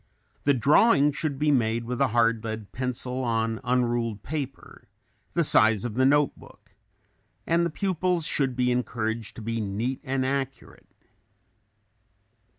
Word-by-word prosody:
The 145 -1 +4
drawings 145 - +4
should 150 -3 -2
be 150 +1 +2
made 115 -3 +1
with 125 +2 -4
a 140 - +4
hard 115 -1 +1
lead 110 -2 -6
pencil 125 0 -3
on 115 -1 -1
un 125 0 +2
ruled 115 -3 -2
paper, 140 -3 -7 0.5
the - - +2
size 110 0 +4
of 120 - -3
the 130 +3 +3
note 145 +1 +3
book, - - -18 0.7
and 170 +1 +2
the 170 - 0
pupils 180 -1 0
should 135 -4 0
be 125 0 +1
encouraged 115 -2 -3
to 115 - -9
be 115 +1 -2
neat 110 +6 -3
and 130 -1 -1
accurate. 135 0 -4
125 Hz, 150 wpm, -26 LUFS, 115-140 Hz, 0.7 s, The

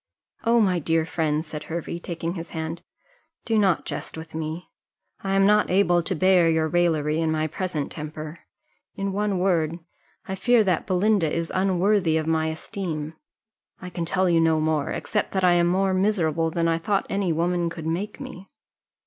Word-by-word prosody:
"Oh, 235 +1 +4
my 185 -5 +3
dear 165 0 +1
friend," 160 -1 -1
said 150 -1 -7
Hervey, 170 +1 -4
taking 170 -1 -4
his 165 -2 -7
hand, 160 +1 -5 0.6
"do 225 - 0
not 190 -4 +2
jest - - -5
with 160 0 -9
me; 160 +2 -4 0.6
I 195 0 0
am 195 0 +4
not 210 +1 +4
able 180 -2 +3
to 185 +3 -2
bear 180 0 +4
your 160 -1 +2
raillery 160 -2 +1
in 160 - +1
my 155 0 0
present 160 -2 -3
temper 155 +1 -7 0.6
in 195 0 -2
one 205 -1 0
word, 170 -3 +1 0.5
I 190 - -3
fear 230 +4 +3
that 185 -5 0
Belinda 190 -3 +2
is 165 0 -2
unworthy 185 -2 +2
of 155 - -1
my 160 0 +1
esteem: 160 -1 -4 0.7
I 180 -1 -8
can 170 -1 -3
tell 185 +2 +1
you 170 -2 +4
no 160 -1 +3
more, 155 -2 0
except 210 - -2
that 190 -1 0
I 180 - +6
am 175 0 +3
more 190 +2 +2
miserable 170 -5 +1
than 165 +1 0
I 165 0 +1
thought 195 +4 0
any 195 -3 0
woman 170 +1 0
could 165 -1 -8
make 185 - -3
me." 255 -9 -9
170 Hz, 185 wpm, -24 LUFS, 160-190 Hz, 0.7 s, I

